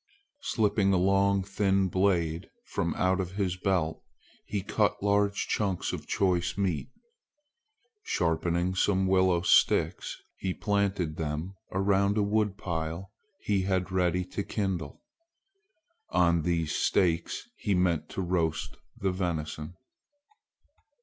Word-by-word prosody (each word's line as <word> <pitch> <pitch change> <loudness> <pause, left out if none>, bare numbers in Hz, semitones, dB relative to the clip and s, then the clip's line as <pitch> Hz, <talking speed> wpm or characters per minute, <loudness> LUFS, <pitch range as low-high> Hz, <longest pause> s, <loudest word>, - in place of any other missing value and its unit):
Slipping 105 -3 +1
a - - +4
long 95 +1 +3
thin 95 -1 +1
blade 85 -3 0 0.2
from - - -2
out 95 +1 +1
his 95 -3 -1
belt, 90 -4 0 0.5
he 100 -2 -2
cut 105 0 0
large 100 0 +2
chunks 95 -4 -1
of - - -6
choice 90 -2 +1
meat. 90 - -1 1.1
Sharpening 85 - 0
some 95 0 +2
willow 95 -2 +3
sticks, - - +2 0.2
he 95 -1 -2
planted 100 -6 0
them 80 +3 -3 0.2
around 100 +1 +2
a 105 - +3
wood 105 -1 +1
pile 85 0 -4 0.3
he 100 -2 +1
had 95 -1 -1
ready 90 -1 +1
to 95 - -4
kindle. 95 -8 -3 1.1
On 85 -2 +3
these 85 -2 0
stakes 85 - +1
he 100 -3 0
meant 85 -4 +1
to - - -4
roast 85 -3 -1 0.2
the 95 -1 0
venison. 85 -3 -3
95 Hz, 115 wpm, -29 LUFS, 85-100 Hz, 1.1 s, a